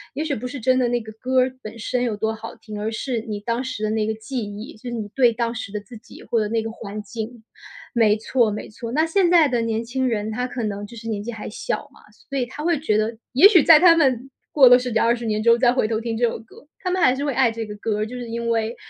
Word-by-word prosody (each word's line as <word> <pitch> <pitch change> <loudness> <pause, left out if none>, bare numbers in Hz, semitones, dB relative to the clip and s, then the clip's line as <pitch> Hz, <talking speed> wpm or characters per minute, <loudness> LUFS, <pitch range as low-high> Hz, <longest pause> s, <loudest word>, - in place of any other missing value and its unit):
也 305 - -2
许 295 -3 -1
不 250 +2 -5
是 275 +2 -6
真 255 +2 +2
的 250 - +2
那 240 0 0
个 220 -1 -9
歌 255 0 +2
儿 255 0 -1
本 215 0 -9
身 245 +2 -2
有 225 -4 -1
多 220 +1 -1
好 220 +1 -8
听， 215 -2 -8
而 220 - -2
是 235 +1 -3
你 215 -2 -5
当 235 +4 -2
时 255 -5 -5
的 215 - 0
那 215 -1 0
个 220 - -1
记 245 +4 -5
忆， 210 +7 -8
就 245 +3 -8
是 - - -6
你 215 -3 -4
对 245 -2 +4
当 235 0 -1
时 225 -4 -6
的 210 - -3
自 210 +3 -13
己 - - -14
或 230 - 0
者 210 - -1
那 225 +1 -1
个 225 - -4
环 210 -1 -7
境。 220 +2 -7 0.5
没 220 -3 +4
错， 230 +1 +1
没 210 - -5
错， 230 +2 -7
那 310 +5 +2
现 350 +2 +2
在 340 -3 +6
的 245 -3 0
年 225 0 -1
轻 260 +2 -1
人 220 -1 -2
他 250 +3 -2
可 245 -1 -5
能 205 -1 -4
就 235 +2 -12
是 225 +1 -8
年 215 -2 -2
纪 235 - -5
还 225 - -7
小 210 - -4
嘛， - - -19 0.3
所 275 -1 -2
以 245 - -1
他 290 +4 -8
会 335 -2 +1
觉 215 -8 +1
得 215 +2 0 0.2
也 280 +10 +9
许 385 -6 +6
在 310 +1 +8
他 340 0 +7
们 270 -4 +1 0.2
过 275 -4 +7
了 245 0 +8
10 250 0 -4
几 225 - +1
20 235 +1 +1
年 215 0 -1
之 235 - +6
后 235 - +4
再 245 -1 +5
回 250 -3 +1
头 220 0 -1
听 230 -1 -3
这 240 +1 +3
首 225 - -4
歌， 230 +5 -17
他 365 - -3
们 370 +1 0
还 255 -7 +4
是 275 - -3
会 285 -3 -1
爱 260 -4 +3
这 225 -1 -5
个 210 - -7
歌 210 0 -2
儿， 215 - 0
就 250 +3 -7
是 245 -1 -6
因 235 0 -3
为， 225 0 0
235 Hz, 320 characters per minute, -22 LUFS, 220-255 Hz, 0.5 s, 也